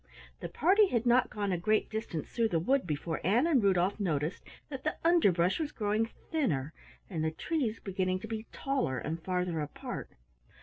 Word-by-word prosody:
The - - -5
party 395 - +4
had 235 -7 0
not 245 +1 +4
gone 205 -2 -2
a 180 - 0
great 215 +5 +2
distance 215 -8 -4
through 230 -1 +1
the 170 - +1
wood, 260 +5 +1
before 155 +1 -2
Ann 225 - +3
and 305 -7 +4
Rudolf 195 0 +2
noticed 160 -4 -1 0.3
that 270 -3 -6
the 310 - -1
underbrush 195 - +4
was 305 -2 -2
growing 215 -1 0 0.2
thinner 160 - 0 0.3
and 160 -4 -3
the 160 - +2
trees 235 - -2
beginning 185 -1 -1
to 220 - -6
be 220 0 -5
taller 270 - -1
and 160 +7 -4
farther 180 -2 -1
apart. 150 - -6
205 Hz, 180 wpm, -31 LUFS, 170-250 Hz, 0.3 s, party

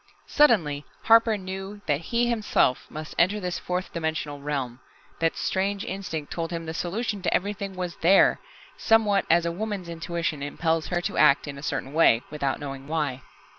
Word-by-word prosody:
Suddenly 170 - +3 0.2
Harper 225 -1 +5
knew 190 +2 -7
that 145 +1 0
he 235 +7 0
himself 215 - +1
must 155 0 -7
enter 195 +4 +3
this 180 -2 -3
fourth 180 +1 -3
dimensional 160 -3 -3
realm. 135 -4 -3 0.4
That 165 0 +1
strange 195 +1 -1
instinct 170 -6 -5
told 165 -1 -3
him 165 -1 -4
the 160 - -5
solution 200 +5 -3
to 180 - 0
everything 200 0 -2
was 180 -2 -4
there 190 +4 +5 0.4
somewhat 215 -3 +3
as 170 +1 +4
a 170 - 0
woman's 200 -1 -4
intuition 165 -2 -3
impels 160 +2 -1
her 175 -1 -1
to - - -3
act 150 -1 +5
in 140 -1 -6
a - - -9
certain 140 -1 -3
way, 140 -7 +4
without 140 -3 -2
knowing 135 -2 -7
why. 150 -5 -2
170 Hz, 170 wpm, -26 LUFS, 150-195 Hz, 0.4 s, Harper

